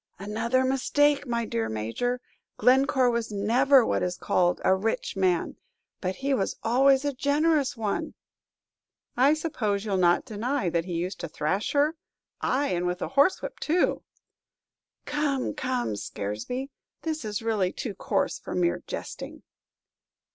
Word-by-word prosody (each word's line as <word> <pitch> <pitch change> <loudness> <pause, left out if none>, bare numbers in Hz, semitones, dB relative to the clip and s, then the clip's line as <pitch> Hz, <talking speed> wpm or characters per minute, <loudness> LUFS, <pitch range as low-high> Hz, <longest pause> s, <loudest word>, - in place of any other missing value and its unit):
"Another 225 +6 0
mistake, 285 +2 +2
my 235 -1 -1
dear 115 - -2
Major. 115 - -2 0.4
Glencore 260 +1 +4
was 235 -2 -2
never 240 +6 +4
what - - 0
is 180 0 -1
called 180 -1 +1
a 190 - +5
rich 210 +3 -1
man, 185 -3 +1 0.4
but 185 0 -2
he 275 +6 -1
was 200 -7 0
always 265 +4 +4
a 285 - 0
generous 285 0 +1
one!" 215 -3 -2 1.0
"I 275 +5 +5
suppose 220 -10 -2
you'll 200 -3 0
not 175 -1 +3
deny 225 -2 -1
that 170 0 0
he 180 - -5
used 180 +3 -3
to - - -4
thrash 155 +7 -1
her? 295 +3 +2 0.4
Ay, 280 +3 +1
and 180 0 0
with 180 +1 -2
a - - -3
horsewhip 280 +7 +2
too!" 340 +3 +1 1.0
"Come, 290 -3 -1
come, 255 - -2
Scaresby; 110 - -4 0.3
this 315 -3 -2
is 210 0 -4
really 210 -5 +1
too 225 - -5
coarse - - -1
for - - -6
mere 175 -1 +1
jesting." - - -7
235 Hz, 145 wpm, -27 LUFS, 185-275 Hz, 1.0 s, a